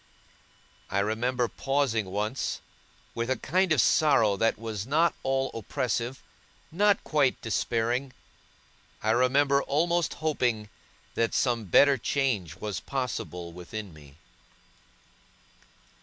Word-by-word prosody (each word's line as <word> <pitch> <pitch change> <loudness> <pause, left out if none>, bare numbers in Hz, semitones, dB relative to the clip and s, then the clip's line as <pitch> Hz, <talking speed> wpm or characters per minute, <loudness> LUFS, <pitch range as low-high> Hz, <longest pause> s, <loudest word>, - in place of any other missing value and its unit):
I 100 - -2
remember 120 +5 0
pausing 135 -6 0
once, 105 +7 -2 0.5
with 115 +1 -3
a 130 - +2
kind 185 +8 +1
of 155 - +4
sorrow 120 -6 +4
that 115 +3 +1
was 110 -2 -5
not 160 +5 +3
all 135 0 0
oppressive, 120 +2 -3 0.5
not 200 +4 +3
quite 145 -4 +1
despairing. 120 +3 -1 0.9
I 110 - +2
remember 140 +4 +3
almost 170 +4 0
hoping 120 -9 -1 0.4
that 115 0 0
some 120 -4 +1
better 140 +8 +5
change 110 - -1
was 105 -3 -4
possible 105 -10 -4
within 90 +3 -8
me. 70 -2 -15
125 Hz, 110 wpm, -27 LUFS, 110-140 Hz, 0.9 s, better